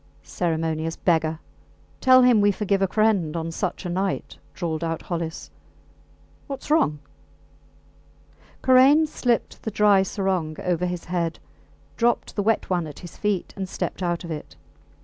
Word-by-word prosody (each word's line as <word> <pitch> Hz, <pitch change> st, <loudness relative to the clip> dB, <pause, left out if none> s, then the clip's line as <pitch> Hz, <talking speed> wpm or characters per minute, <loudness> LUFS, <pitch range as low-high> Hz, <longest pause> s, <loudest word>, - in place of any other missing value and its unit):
Ceremonious 160 Hz, -1 st, -2 dB
beggar. 160 Hz, -2 st, +1 dB, 0.6 s
Tell 255 Hz, 0 st, +6 dB
him 245 Hz, -4 st, +5 dB
we 205 Hz, 0 st, +4 dB
forgive 200 Hz, 0 st, 0 dB
a 195 Hz, -, +3 dB
friend... 195 Hz, -6 st, +1 dB
on 165 Hz, 0 st, -3 dB
such 185 Hz, +2 st, -3 dB
a -, -, -2 dB
night, 190 Hz, +2 st, -2 dB, 0.2 s
drawled 165 Hz, -2 st, -3 dB
out 165 Hz, -1 st, -3 dB
Hollis. 165 Hz, -2 st, -5 dB, 1.0 s
Whats 280 Hz, +1 st, -6 dB
wrong? 155 Hz, -, +3 dB, 1.7 s
Karain 265 Hz, +5 st, +6 dB
slipped 245 Hz, -6 st, -1 dB
the -, -, -3 dB
dry 210 Hz, -2 st, +4 dB
sarong 190 Hz, -5 st, -1 dB
over 180 Hz, 0 st, 0 dB
his 175 Hz, -1 st, -4 dB
head, 170 Hz, -2 st, -2 dB, 0.6 s
dropped 240 Hz, 0 st, +1 dB
the 205 Hz, -, 0 dB
wet 220 Hz, +2 st, +1 dB
one 175 Hz, -3 st, -1 dB
at 150 Hz, -, -10 dB
his 175 Hz, -4 st, -10 dB
feet, 205 Hz, -4 st, -2 dB
and 190 Hz, -2 st, -5 dB
stepped -, -, -4 dB
out 175 Hz, -1 st, -1 dB
of 170 Hz, -, -7 dB
it. 150 Hz, -2 st, -7 dB
180 Hz, 150 wpm, -24 LUFS, 165-210 Hz, 1.7 s, Tell